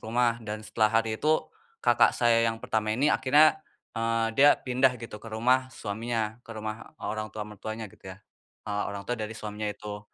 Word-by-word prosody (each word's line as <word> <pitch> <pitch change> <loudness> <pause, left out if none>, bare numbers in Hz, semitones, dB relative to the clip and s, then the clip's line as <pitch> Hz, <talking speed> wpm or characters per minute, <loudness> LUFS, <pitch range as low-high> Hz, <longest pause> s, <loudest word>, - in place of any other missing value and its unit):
rumah 120 0 +1
dan 110 0 -6
setelah 110 0 +2
hari 110 -1 0
itu, 155 +1 +2 0.4
kakak - - +4
saya 115 -1 +4
yang 115 - -2
pertama 110 0 0
ini 145 +3 +3
akhirnya, 155 +3 +5 0.3
eee, 115 0 0
dia 140 +5 +6
pindah 125 0 +2
gitu 110 -2 -9
ke 115 - -10
rumah 125 +4 +2
suaminya, 110 0 -3
ke 115 - -15
rumah 110 +1 -7
orang 110 0 -4
tua 105 +1 -6
mertuanya 110 0 -7
gitu 95 - -13
ya, 95 - -8 0.5
eee, 105 0 -1
orang 100 -1 -6
tua 120 0 -3
dari 110 +1 -5
suaminya 105 0 -4
itu. 105 0 -6
110 Hz, 185 wpm, -28 LUFS, 105-120 Hz, 0.5 s, dia